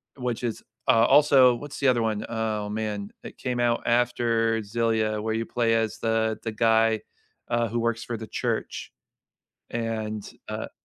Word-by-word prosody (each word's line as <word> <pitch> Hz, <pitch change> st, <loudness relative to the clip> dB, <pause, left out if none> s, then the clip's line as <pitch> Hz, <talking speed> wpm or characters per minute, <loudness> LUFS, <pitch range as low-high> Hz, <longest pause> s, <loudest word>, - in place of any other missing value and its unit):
which 125 Hz, -3 st, -3 dB
is, 115 Hz, -2 st, -3 dB, 0.2 s
uh, 115 Hz, -3 st, +5 dB
also 135 Hz, -3 st, +6 dB
what's 145 Hz, +3 st, -8 dB
the 140 Hz, -2 st, +4 dB
other 120 Hz, -2 st, +2 dB
one? 110 Hz, -1 st, -1 dB
Oh, 110 Hz, -2 st, -2 dB
man. 105 Hz, -1 st, -3 dB
It -, -, -10 dB
came 125 Hz, -2 st, -3 dB
out 120 Hz, -1 st, +1 dB
after 115 Hz, -1 st, +2 dB
Xillia 110 Hz, 0 st, 0 dB
where 110 Hz, 0 st, -1 dB
you 115 Hz, +1 st, -1 dB
play 115 Hz, -2 st, +1 dB
as 115 Hz, -1 st, 0 dB
the 110 Hz, -1 st, 0 dB
the 115 Hz, -, -2 dB
guy, 115 Hz, 0 st, +3 dB, 0.5 s
uh, 120 Hz, -1 st, +1 dB
who 120 Hz, +2 st, -2 dB
works 115 Hz, 0 st, -1 dB
for 120 Hz, -, -3 dB
the 110 Hz, 0 st, -8 dB
church, -, -, -3 dB, 0.8 s
and, 110 Hz, -3 st, -3 dB, 0.3 s
uh -, -, -5 dB
115 Hz, 165 wpm, -26 LUFS, 110-120 Hz, 0.8 s, also